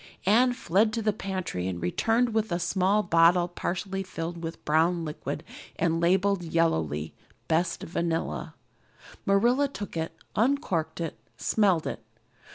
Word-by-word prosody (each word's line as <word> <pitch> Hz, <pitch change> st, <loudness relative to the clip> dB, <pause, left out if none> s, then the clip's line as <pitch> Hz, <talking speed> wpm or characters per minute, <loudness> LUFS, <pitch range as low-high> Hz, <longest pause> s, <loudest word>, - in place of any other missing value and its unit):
Anne 235 Hz, +6 st, +5 dB
fled 215 Hz, -2 st, +2 dB
to 230 Hz, -, -2 dB
the 215 Hz, -1 st, +1 dB
pantry 185 Hz, -, -3 dB
and 90 Hz, -2 st, -3 dB
returned 225 Hz, -, +1 dB
with 220 Hz, -2 st, 0 dB
a 170 Hz, -, +1 dB
small 190 Hz, +4 st, +2 dB
bottle 175 Hz, 0 st, +4 dB
partially 190 Hz, +2 st, -3 dB
filled 170 Hz, -2 st, -5 dB
with 165 Hz, 0 st, -4 dB
a -, -, -34 dB
brown 165 Hz, +2 st, +2 dB
liquid 150 Hz, -1 st, -5 dB, 0.3 s
and 165 Hz, -1 st, 0 dB
labeled 190 Hz, +2 st, +3 dB
yellowly, 80 Hz, -, 0 dB, 0.3 s
"Best 165 Hz, +1 st, 0 dB
Vanilla." 165 Hz, -, -2 dB, 0.7 s
Marilla 240 Hz, +8 st, +4 dB
took 205 Hz, -10 st, -7 dB
it, 165 Hz, 0 st, -3 dB, 0.2 s
uncorked 220 Hz, -, 0 dB
it, 165 Hz, -2 st, -4 dB, 0.2 s
smelled 190 Hz, -7 st, +2 dB
it. -, -, -4 dB
175 Hz, 140 wpm, -27 LUFS, 165-205 Hz, 0.7 s, Anne